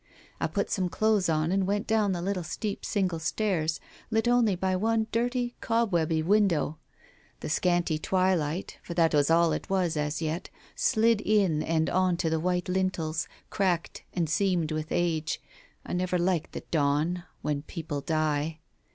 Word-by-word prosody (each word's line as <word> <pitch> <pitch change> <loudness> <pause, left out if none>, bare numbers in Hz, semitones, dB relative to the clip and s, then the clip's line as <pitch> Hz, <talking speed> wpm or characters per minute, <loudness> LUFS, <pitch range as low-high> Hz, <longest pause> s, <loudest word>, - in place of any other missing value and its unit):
I - - +1
put - - -2
some 185 -3 0
clothes 215 -2 +2
on 155 +1 +1
and 190 -1 +1
went 205 +1 0
down 220 -3 +2
the 175 -2 -2
little 190 -1 -1
steep 200 +6 -4
single 185 -6 0
stairs, 160 -2 0 0.3
lit 225 +1 +1
only 240 -5 +4
by 185 +1 0
one 220 +3 +1
dirty, 245 +1 0
cobwebby 170 -9 +1
window. 170 -6 +2 0.6
The - - -4
scanty 175 -1 +1
twilight, 185 -2 0
for 170 - -7
that 165 -2 +3
was 145 0 +3
all 165 0 +4
it - - -3
was 185 -4 +1
as 150 0 -1
yet, 160 +1 -3 0.3
slid 225 -1 +3
in 195 -8 +2
and 160 0 +1
on 185 -1 +2
to 165 -2 0
the 160 - +1
white 180 +2 0
lintels, 180 -4 -1 0.2
cracked 180 -4 0
and 170 -3 -1
seamed 175 -1 +1
with 155 0 -2
age 160 -3 0 0.2
— - - -32
I - - -5
never 180 0 0
liked 175 -2 0
the - - -5
dawn, 155 +3 +1 0.2
when 145 -1 -1
people 155 -2 -5
die. 155 0 -1
175 Hz, 170 wpm, -28 LUFS, 160-195 Hz, 0.6 s, only